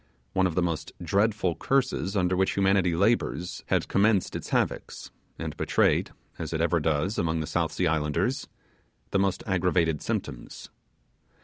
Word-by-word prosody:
One 95 -1 +3
of 85 - -4
the 90 - +2
most 85 -2 -3
dreadful 100 0 +1
curses 125 -5 0
under 90 -1 +2
which 95 +1 +1
humanity 95 -3 +3
labours 100 -2 0
had - - +1
commenced 100 -1 +2
its - - -5
havocks, - - -2 0.3
and - - -5
betrayed, - - +2 0.3
as - - -4
it 80 - -1
ever 85 +1 +2
does 80 +6 0
among 80 -1 0
the 80 - -2
South 85 0 -1
Sea 90 - 0
islanders, 75 -2 0 0.6
the 95 - +2
most 95 -1 0
aggravated 90 -5 +1
symptoms. - - -5
90 Hz, 150 wpm, -27 LUFS, 80-100 Hz, 0.6 s, One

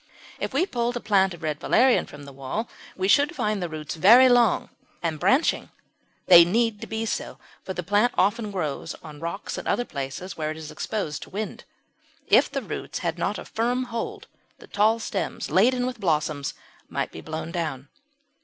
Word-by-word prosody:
If - - -3
we 360 - +2
pulled 240 -6 -1
a - - -3
plant 195 -4 +2
of 170 - -16
Red 150 -1 -2
Valerian 255 0 +3
from 145 0 -11
the 140 -1 -11
wall 140 - -4 0.3
we 190 0 0
should 290 - +4
find 210 -2 -1
the 175 - -2
roots 155 -1 -5
very 230 +10 +7
long 240 -4 +3 0.3
and 160 -2 -1
branching; 270 - +2 0.6
they 175 -2 +9
need 220 +4 +1
to - - -6
be 220 0 -3
so, - - -3 0.3
for 190 - -5
the 180 - -3
plant 205 +7 +2
often 210 +3 +2
grows 170 -8 -3
on 150 -2 -10
rocks 170 +6 -4
and - - -8
other 245 - +1
places 140 - -6
where 155 -1 -2
it 155 - -5
is 155 -1 -8
exposed 175 -10 -3
to - - -9
wind. 210 +2 -5 0.6
If - - +5
the - - -3
roots - - -5
had - - -1
not - - -1
a - - -8
firm 245 +3 -1
hold 230 - -4 0.3
the - - -14
tall 215 +2 +2
stems 210 -3 -4
laden 245 +6 +3
with 250 -2 -4
blossoms 150 -6 -1 0.3
might - - -2
be 80 - -9
blown 160 - -5
down. 155 -6 -3
195 Hz, 190 wpm, -25 LUFS, 155-230 Hz, 0.6 s, they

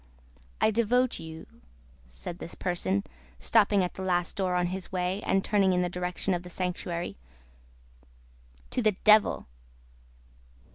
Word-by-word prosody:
"I 220 - +4
devote 240 +3 +2
you," 160 0 -8 0.6
said 170 - -7
this - - -7
person, 190 +2 0 0.3
stopping 205 -3 +3
at 180 - -3
the - - -8
last 180 -2 0
door 185 -2 0
on 180 0 +2
his 190 -1 -4
way, 185 +2 -1
and 195 -2 +1
turning 195 -3 +3
in 180 0 +2
the 175 - -1
direction 180 +2 -1
of 175 - -1
the 180 - -10
sanctuary, 175 - -3 1.5
"to - - 0
the 215 -2 +3
Devil!" 215 -1 +5
185 Hz, 140 wpm, -28 LUFS, 180-200 Hz, 1.5 s, Devil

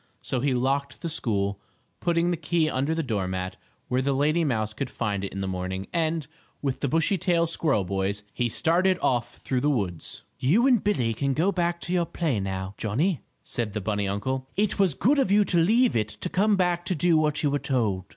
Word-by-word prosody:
So 130 - -1
he 135 0 +1
locked 140 +3 -1
the 170 - -1
school, 100 -8 -1 0.4
putting 170 0 +1
the - - +1
key 165 0 0
under 145 +2 0
the 165 - -1
doormat, 95 -6 -2 0.3
where 125 +1 +1
the 140 +1 +1
lady 150 +5 +2
mouse 110 -7 -1
could 130 +3 -4
find 105 -5 -2
it 100 - -4
in 100 - -5
the 95 - -2
morning, 95 +1 -3
and, 160 -2 0 0.3
with 135 -3 -2
the 140 - 0
Bushytail 170 +2 +2
squirrel 155 -9 +1
boys, 100 +2 -2
he 120 -1 0
started 180 - +2
off 120 -1 0
through 130 -2 -2
the 145 - +2
woods. 95 - -3 0.2
"You 165 - +3
and 250 -6 +4
Billie 125 - +1
can 135 +4 0
go 180 +6 +2
back 175 -2 0
to 175 - -2
your 175 -2 +1
play, 155 -11 -1
now, 95 0 -3
Johnnie," 145 - 0 0.2
said 115 -5 -3
the 105 - -2
bunny 100 0 -1
uncle. 130 +7 -2
"It 205 -1 +1
was 185 -8 +3
good 275 - +3
of 265 - +2
you 205 +1 +4
to 175 - +1
leave 230 +9 +4
it 105 -2 +1
to 105 +12 -5
come 205 +4 +3
back 175 -2 +1
to 185 - -1
do 170 +2 +3
what 155 -1 +2
you 145 - +2
were 145 - +1
told." 110 -10 0
140 Hz, 215 wpm, -26 LUFS, 105-170 Hz, 0.4 s, and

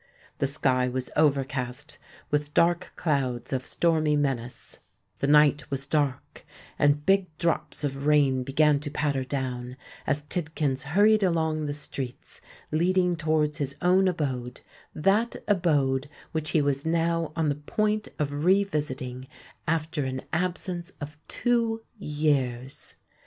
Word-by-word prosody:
The 140 - +2
sky 130 -2 +1
was 130 0 -3
overcast 140 -1 0 0.3
with 150 0 -1
dark 175 +1 +3
clouds 135 -6 -1
of 130 -1 -1
stormy 155 -2 +2
menace: 130 -4 -3 0.4
the 140 - 0
night 150 0 +4
was 135 0 -2
dark; 145 -3 -1 0.4
and 145 0 +3
big 195 -1 +3
drops 170 -2 0
of 140 0 -2
rain 140 -4 +4
began 145 +3 +3
to 145 0 -5
patter 145 -2 -1
down, 125 -2 -4 0.3
as 145 +1 0
Tidkins 150 -4 -1 0.2
hurried 215 +1 +6
along 160 -4 +1
the 145 - -2
streets 135 -3 -7 0.3
leading 180 +2 +2
towards 155 -1 0
his 140 -1 -2
own 185 +2 +4
abode—that 155 - -1
abode 145 -8 +2 0.2
which 155 -1 -2
he 155 - +2
was 140 -1 0
now 165 -1 0
on 160 -2 +1
the - - +2
point 210 +9 -1
of 145 0 -2
revisiting 150 -9 0 0.4
after 160 -1 0
an 130 0 -3
absence 180 +1 -1
of 150 +1 -7
two 230 -2 0 0.2
years! 140 -6 -1
150 Hz, 130 wpm, -27 LUFS, 135-170 Hz, 0.4 s, hurried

